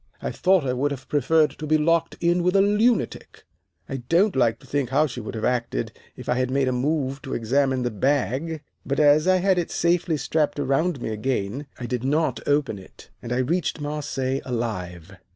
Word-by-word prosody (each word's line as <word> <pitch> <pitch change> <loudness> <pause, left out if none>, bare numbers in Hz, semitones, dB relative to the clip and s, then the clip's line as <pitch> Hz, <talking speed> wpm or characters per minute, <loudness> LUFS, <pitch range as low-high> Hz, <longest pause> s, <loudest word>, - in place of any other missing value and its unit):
I - - -3
thought 185 -5 +2
I 125 - 0
would 135 +3 0
have 135 -2 -7
preferred 150 +1 +3
to 155 +2 -7
be 155 +1 +4
locked 165 +2 +1
in 175 +1 +2
with 180 +2 +1
a 195 - +6
lunatic. 210 +3 0 0.4
I 135 - -4
don't 170 - +2
like 120 -4 +2
to - - -16
think 140 -4 -1
how 145 +4 +3
she 130 -4 -5
would 110 - -7
have 110 - -2
acted 120 - -1 0.2
if - - -10
I - - +2
had 130 0 0
made 135 0 +1
a - - +2
move 135 +1 -1
to 135 - -5
examine 130 +2 +1
the 120 - -1
bag, 140 - -1 0.2
but 140 - -2
as 150 +2 +5
I 185 - +5
had 185 0 +2
it 170 - -2
safely 170 -1 +1
strapped 150 +1 0
around 140 +1 0
me - - -2
again, 115 +3 -2
I 125 - -4
did 125 0 -3
not 140 -3 +1
open 145 -8 +1
it, 95 - -16
and 120 - -7
I 125 - +1
reached 165 +5 -1
Marseilles 145 -3 -2
alive. 95 -7 -4
140 Hz, 205 wpm, -24 LUFS, 125-160 Hz, 0.4 s, a